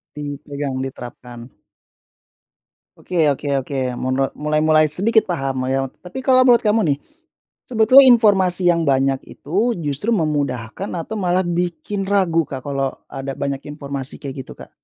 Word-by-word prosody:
Dipegang, 145 -1 -5
diterapkan. 120 -2 -9 1.5
Oke 165 -4 0
oke 145 +1 -1
oke. 135 +1 -5 0.2
Munle 130 +1 -1
mulai 150 +1 0
mulai 155 0 +5
sedikit 215 +9 +2
paham 135 -6 -2
lah - - -3
ya. 135 - +1 0.2
Tapi 185 +9 -8
kalau 255 -1 +5
menurut 240 -2 +5
kamu 215 +1 +3
nih, 140 - -14 0.7
sebetulnya 250 +3 +6
informasi 195 -7 +4
yang 170 -1 +1
banyak 135 0 +2
itu 210 +11 -1
justru 145 - -2
memudahkan 145 - -2
atau 175 +6 -5
malah 185 0 +1
bikin 175 +3 -2
ragu 180 -5 +2
Kak, 130 -2 -7
kalau 135 -1 -2 0.2
ada 135 0 -5
banyak 140 -1 -3
informasi 140 -2 -6
kayak 140 -1 -7
gitu - - -10
Kak? - - -12
150 Hz, 145 wpm, -20 LUFS, 135-190 Hz, 1.5 s, sebetulnya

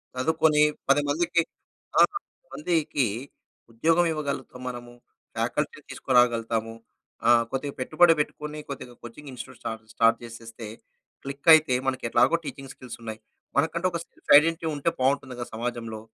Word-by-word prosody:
చదువుకుని 155 +2 +2 0.3
10 145 +1 +5
మందికి 170 +3 +2 0.6
ఆ! - - +8
10 - - -10
మందికి 160 - 0 0.7
ఉద్యోగం 165 +9 +2
ఇవ్వగలుగుతాం 140 -4 -4
మనము. 120 0 -8 0.4
ఫ్యాకల్టీ - - -2
తీసుకురాగలుగుతాము. 115 -3 +1 0.5
ఆహ్, 120 -1 +6
కొద్దిగా 140 +1 -3
పెట్టుబడి 165 +6 +5
పెట్టుకొని, 150 +1 -3
కొద్దిగా 125 -3 -7
కోచింగ్ 140 +5 -10
ఇన్స్‌టిట్యూట్ 125 - -10
స్టా - - -3 0.2
స్టార్ట్ 115 0 +4
చేసేస్తే, 115 -1 -9 0.6
క్లిక్ 140 +4 -2
అయితే 155 -4 +5
మనకి 130 -1 -1
ఎట్లాగో 125 +9 +4
టీచింగ్ 135 -1 -7
స్కిల్స్ 125 -2 -10
ఉన్నాయి. 110 -1 -7 0.4
మనకంటూ 165 +5 +1
ఒక 170 - -3
సెల్ఫ్ - - -7
ఐడెంటిటీ 165 +1 +2
ఉంటే 145 +4 0
బాగుంటుంది 130 -1 0
కదా 120 - -4
సమాజంలో. 115 -1 -4
135 Hz, 135 wpm, -26 LUFS, 120-155 Hz, 0.7 s, ఆ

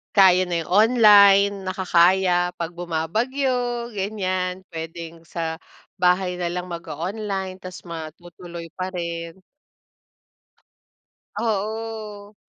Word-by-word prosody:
Kaya 185 -2 +6
na 175 -1 -3
yung 160 - -6
online, 205 -2 +7
nakakaya 180 -1 +3
'pag 170 +1 -4
bumabagyo, 235 - -1
ganyan, 185 -2 -2
puwedeng 165 0 -8
sa 165 -1 -4 0.4
bahay 180 0 +2
na 175 -1 -2
lang 180 0 -4
mag-o-online 185 +4 -4
ta's 185 0 -8
matutuloy 170 +1 -8
pa 185 0 -4
rin. 170 0 -5 2.0
Oo. 215 -1 -4
185 Hz, 90 wpm, -23 LUFS, 170-205 Hz, 2.0 s, online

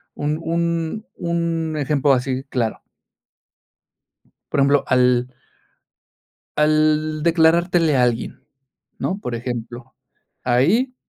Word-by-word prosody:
un 150 +1 -2
un 170 +4 -2
un 165 -2 -2
ejemplo 145 -1 +1
así 130 +1 -1
claro. 115 -4 -2 1.7
Por - - 0
ejemplo, 140 +1 +3
al. 125 0 +2 1.2
Al 155 0 +2
declarártele 165 -1 +3
a 125 - +3
alguien, 120 -1 -2 0.5
¿no? 195 +2 -2
Por 120 - -4
ejemplo, 120 +1 -6 0.5
ahí. 175 - +2
150 Hz, 90 wpm, -21 LUFS, 125-165 Hz, 1.7 s, ejemplo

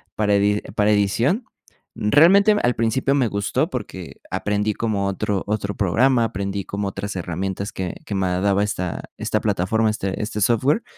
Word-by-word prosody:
para 105 -1 +1
edi 105 +1 +2
para 105 0 +3
edición, 110 - +1 0.5
realmente 170 - +5
al 120 -1 +1
principio 115 +4 +1
me 130 -4 +2
gustó 100 0 -1
porque - - -7
aprendí 105 +1 0
como 105 -3 -1
otro 100 0 -1
otro 100 -1 -2
programa, 115 +6 +3
aprendí 100 -1 -3
como 100 0 -3
otras 100 +1 -5
herramientas 95 +3 -3
que 90 -2 -4
que 100 - -4
me 95 -1 0
daba 95 +2 +1
esta 90 -4 -3
esta - - -1
plataforma, 110 +5 +1
este 100 -2 -3
este 105 0 -3
software, 125 - +2
105 Hz, 160 wpm, -22 LUFS, 100-115 Hz, 0.5 s, realmente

